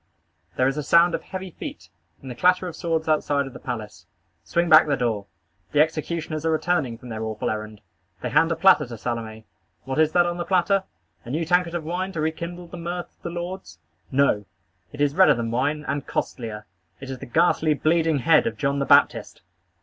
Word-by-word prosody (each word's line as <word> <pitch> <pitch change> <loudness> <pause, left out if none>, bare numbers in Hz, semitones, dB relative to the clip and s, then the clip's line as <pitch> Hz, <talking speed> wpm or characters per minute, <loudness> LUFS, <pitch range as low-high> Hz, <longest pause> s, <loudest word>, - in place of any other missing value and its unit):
There 130 - +2
is 135 +2 -1
a - - -1
sound 170 +4 +4
of - - -2
heavy 190 -1 -7
feet, 85 - -9 0.3
and 130 - -7
the - - -4
clatter 180 +6 +2
of 175 - -7
swords 160 -2 -2
outside 145 -2 +1
of 135 - -9
the - - -10
palace. 105 -7 -7 0.4
Swing 170 - 0
back 155 -1 +7
the 140 -2 +1
door. 110 -5 -1 0.5
The 145 - +3
executioners 155 0 -1
are 165 - +1
returning, 155 -6 0
from 125 +2 -12
their 110 -1 -5
awful 110 -1 -2
errand. 110 -1 -6 0.4
They - - -2
hand 165 +1 +3
a - - +1
platter 190 -7 +5
to 120 -1 -8
Salome. 110 -1 -5 0.4
What 135 +3 -3
is 155 -1 +4
that 175 -1 +4
on 175 0 -2
the 175 - -2
platter? 190 +2 +1 0.4
A - - -10
new 160 +6 -1
tankard 175 0 +1
of 170 - -3
wine 180 +4 -3
to 165 - -4
rekindle 170 +3 -4
the 175 - -8
mirth 175 +1 -5
of - - -42
the - - -5
lords? 175 - -6 0.3
No! 130 -7 +2 0.5
It 145 - -7
is 145 -1 +2
redder 190 +4 +6
than 115 -1 -3
wine, 145 +5 -1
and 140 -1 -3
costlier. 110 -3 -4 0.3
It 135 -1 -7
is 130 - -6
the - - -9
ghastly, 155 +3 +2
bleeding 160 +1 +2
head 165 - +4
of 230 - -4
John 140 0 0
the 140 - 0
Baptist! - - +3
155 Hz, 210 wpm, -24 LUFS, 125-170 Hz, 0.5 s, back